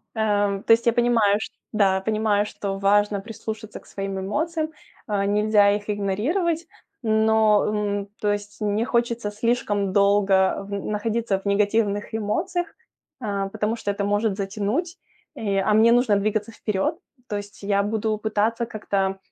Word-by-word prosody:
Эм, 205 Hz, -2 st, +1 dB
то -, -, +1 dB
есть 230 Hz, +1 st, +5 dB
я 235 Hz, -, +5 dB
понимаю, 230 Hz, -4 st, +3 dB
что -, -, -7 dB, 0.2 s
Да. 200 Hz, -3 st, +3 dB
Я 190 Hz, -, -1 dB
понимаю, 215 Hz, 0 st, +1 dB
что 200 Hz, -1 st, -4 dB
важно 205 Hz, +1 st, +2 dB
прислушаться 220 Hz, 0 st, -7 dB
к -, -, -23 dB
своим 195 Hz, -1 st, -4 dB
эмоциям, 315 Hz, -, -2 dB, 0.4 s
а, 200 Hz, -2 st, 0 dB
нельзя 205 Hz, 0 st, +4 dB
их 205 Hz, +1 st, -6 dB
игнорировать, 280 Hz, -, 0 dB, 0.3 s
но, 220 Hz, -2 st, +3 dB
м, 205 Hz, -1 st, -1 dB
то 210 Hz, -, +2 dB
есть 205 Hz, 0 st, -6 dB
не 210 Hz, +2 st, 0 dB
хочется 235 Hz, -3 st, 0 dB
слишком 210 Hz, -3 st, 0 dB
долго 200 Hz, -1 st, +3 dB
в -, -, -13 dB
на 200 Hz, 0 st, -2 dB
находиться 215 Hz, -1 st, -1 dB
в 195 Hz, -, -21 dB
негативных 205 Hz, +1 st, +1 dB
эмоциях, 325 Hz, -, -1 dB, 0.5 s
э, 200 Hz, -3 st, -2 dB
потому 210 Hz, +3 st, -1 dB
что 205 Hz, -, -4 dB
это 200 Hz, 0 st, -3 dB
может 205 Hz, 0 st, 0 dB
затянуть, 210 Hz, -, -2 dB, 0.4 s
и, 200 Hz, -3 st, -1 dB
а 195 Hz, +2 st, +2 dB
мне 220 Hz, +2 st, +6 dB
нужно 245 Hz, -3 st, +3 dB
двигаться 215 Hz, +2 st, -1 dB
вперед. 210 Hz, -3 st, -1 dB, 0.3 s
То 210 Hz, -, -2 dB
есть 205 Hz, 0 st, -9 dB
я 200 Hz, 0 st, +2 dB
буду 215 Hz, +1 st, -1 dB
пытаться 220 Hz, +2 st, 0 dB
как-то, 195 Hz, -3 st, -1 dB
210 Hz, 160 wpm, -24 LUFS, 200-220 Hz, 0.5 s, мне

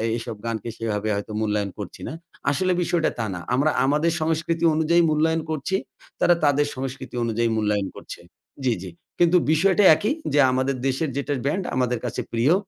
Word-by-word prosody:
এইসব 115 Hz, -1 st, -5 dB
গানকে 115 Hz, 0 st, -3 dB
সেভাবে 110 Hz, -1 st, -2 dB
হয়তো 100 Hz, +1 st, -5 dB
মূল্যায়ন 105 Hz, -2 st, -1 dB
করছি 100 Hz, -, -7 dB
না। -, -, -5 dB, 0.4 s
আসলে 185 Hz, +5 st, +1 dB
বিষয়টা 170 Hz, -1 st, +1 dB
তা 115 Hz, -, 0 dB
না। 90 Hz, -, -5 dB, 0.2 s
আমরা 145 Hz, +4 st, +2 dB
আমাদের 150 Hz, +4 st, +2 dB
সংস্কৃতি 165 Hz, +1 st, -1 dB
অনুযায়ী 165 Hz, +2 st, +3 dB
মূল্যায়ন 160 Hz, +1 st, +2 dB
করছি। 155 Hz, +4 st, -2 dB, 0.4 s
তারা 175 Hz, -, +5 dB
তাদের 145 Hz, 0 st, +3 dB
সংস্কৃতি 130 Hz, -1 st, -6 dB
অনুযায়ী 115 Hz, 0 st, 0 dB
মূল্যায়ন 105 Hz, -2 st, 0 dB
করছে। -, -, -9 dB, 0.5 s
জি, 120 Hz, -, +3 dB
জি। 95 Hz, -, -7 dB, 0.3 s
কিন্তু 175 Hz, +1 st, +5 dB
বিষয়টা 190 Hz, +5 st, +3 dB
একই, 215 Hz, -, 0 dB, 0.2 s
যে 145 Hz, -, +4 dB
আমাদের 130 Hz, +1 st, 0 dB
দেশের 135 Hz, +3 st, 0 dB
যেটা 140 Hz, +1 st, -1 dB
ব্যান্ড 185 Hz, +7 st, 0 dB
আমাদের 125 Hz, -2 st, 0 dB
কাছে 120 Hz, -, -3 dB
প্রিয়। 120 Hz, +7 st, +3 dB
135 Hz, 170 wpm, -23 LUFS, 115-160 Hz, 0.5 s, তারা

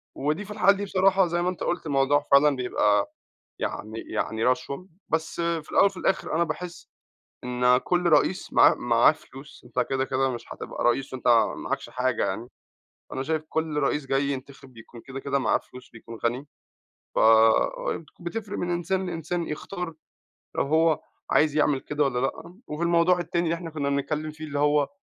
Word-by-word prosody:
ودي 155 Hz, +9 st, -1 dB
في 210 Hz, -, -10 dB
الحالة 205 Hz, -1 st, +4 dB
دي 205 Hz, -, -3 dB
بصراحة 190 Hz, -1 st, +3 dB
زي 175 Hz, +1 st, -1 dB
ما 180 Hz, -, +1 dB
أنت 185 Hz, -, -5 dB
قلت 175 Hz, -1 st, -2 dB
الموضوع 140 Hz, 0 st, +2 dB
فعلًا 140 Hz, +1 st, +6 dB
بيبقى 105 Hz, -5 st, +1 dB, 0.5 s
يعني 110 Hz, +2 st, -4 dB
يعني 110 Hz, 0 st, -2 dB
رشوة، 130 Hz, +8 st, -1 dB, 0.2 s
بس 160 Hz, 0 st, -1 dB
في 170 Hz, -2 st, -2 dB
الأول -, -, +5 dB
وفي 195 Hz, -2 st, 0 dB
الآخر 175 Hz, -, -1 dB
أنا 170 Hz, -, +3 dB
باحس 170 Hz, +1 st, -6 dB, 0.6 s
إن 125 Hz, 0 st, +3 dB
كل 180 Hz, +5 st, 0 dB
رئيس 170 Hz, +5 st, +2 dB
معاه -, -, +6 dB
معاه 120 Hz, +4 st, +4 dB
فلوس. 140 Hz, -1 st, -14 dB
أنت 125 Hz, 0 st, -1 dB
كده 135 Hz, 0 st, +1 dB
كده 135 Hz, 0 st, 0 dB
مش 120 Hz, -2 st, -6 dB
هتبقى -, -, -6 dB
رئيس 130 Hz, +3 st, +1 dB
وأنت 130 Hz, -1 st, -2 dB, 0.3 s
معاكش -, -, -4 dB
حاجة 130 Hz, 0 st, 0 dB
يعني، 120 Hz, +2 st, -4 dB, 0.6 s
أنا 130 Hz, -, -2 dB
شايف 155 Hz, +2 st, -1 dB
كل 160 Hz, -1 st, -2 dB
رئيس 145 Hz, 0 st, 0 dB
جاي 135 Hz, +1 st, +1 dB
ينتخب 135 Hz, -1 st, -7 dB
بيكون 115 Hz, +1 st, -13 dB
كده 135 Hz, +3 st, -8 dB
كده 140 Hz, 0 st, 0 dB
معاه 125 Hz, -5 st, +2 dB
فلوس، 125 Hz, 0 st, -14 dB
بيكون 115 Hz, 0 st, -11 dB
غني، 125 Hz, +5 st, -2 dB, 0.7 s
فبتفرق 165 Hz, -, +2 dB
من 175 Hz, -, -2 dB
إنسان 185 Hz, +2 st, -1 dB
لإنسان 170 Hz, 0 st, -3 dB
يختار 170 Hz, +2 st, -5 dB, 0.6 s
لو -, -, +1 dB
هو 160 Hz, +2 st, +2 dB, 0.3 s
عايز 150 Hz, -1 st, +3 dB
يعمل 150 Hz, -2 st, +3 dB
كده 150 Hz, +1 st, -1 dB
والّا 135 Hz, -3 st, 0 dB
لأ. 135 Hz, +6 st, -3 dB
وفي 150 Hz, +3 st, -5 dB
الموضوع 170 Hz, +1 st, +3 dB
التاني 170 Hz, 0 st, -1 dB
اللي 165 Hz, -, +1 dB
إحنا 170 Hz, -1 st, -6 dB
كنا 145 Hz, -2 st, -2 dB
بنتكلم 150 Hz, +2 st, -2 dB
فيه، 155 Hz, +1 st, -9 dB
اللي 145 Hz, -2 st, -4 dB
هو 145 Hz, 0 st, +3 dB
150 Hz, 175 wpm, -26 LUFS, 130-170 Hz, 0.7 s, فعلًا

